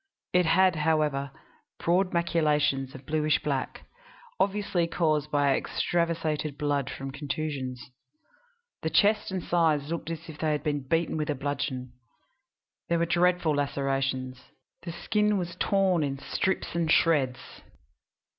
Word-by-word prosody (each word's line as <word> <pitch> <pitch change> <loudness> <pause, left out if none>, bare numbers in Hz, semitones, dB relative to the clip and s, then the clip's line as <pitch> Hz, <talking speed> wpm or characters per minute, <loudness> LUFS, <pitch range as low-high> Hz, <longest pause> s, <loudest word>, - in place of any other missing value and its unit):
It 180 -2 +4
had, 185 +1 +4
however, 150 -3 +1 0.5
broad 180 +2 +1
maculations 150 -5 +1
of 135 0 -11
bluish 155 -1 +2
black, 140 -4 -3 0.5
obviously 195 -4 +1
caused 155 -4 0
by 145 -2 +3
extravasated 160 -4 -1
blood 145 -2 0
from 135 0 -6
contusions. 140 -3 -4 0.9
The 160 - -1
chest 210 +6 +3
and 185 -2 -3
sides 160 -4 +1
looked 170 -1 -3
as 165 0 -6
if 155 -2 -10
they 155 -1 +1
had 150 - -2
been 145 -4 -2
beaten 165 +1 +1
with 150 -1 -2
a 150 - +1
bludgeon. 135 -2 -3 1.0
There 170 - +2
were 170 - +2
dreadful 175 -1 +2
lacerations; 135 -2 -1 0.4
the 170 - -6
skin 210 +4 +1
was 175 -2 -4
torn 190 -4 +2
in 140 -2 -1
strips 190 +6 -2
and 165 -2 0
shreds. 140 -8 +1
155 Hz, 135 wpm, -28 LUFS, 140-170 Hz, 1.0 s, It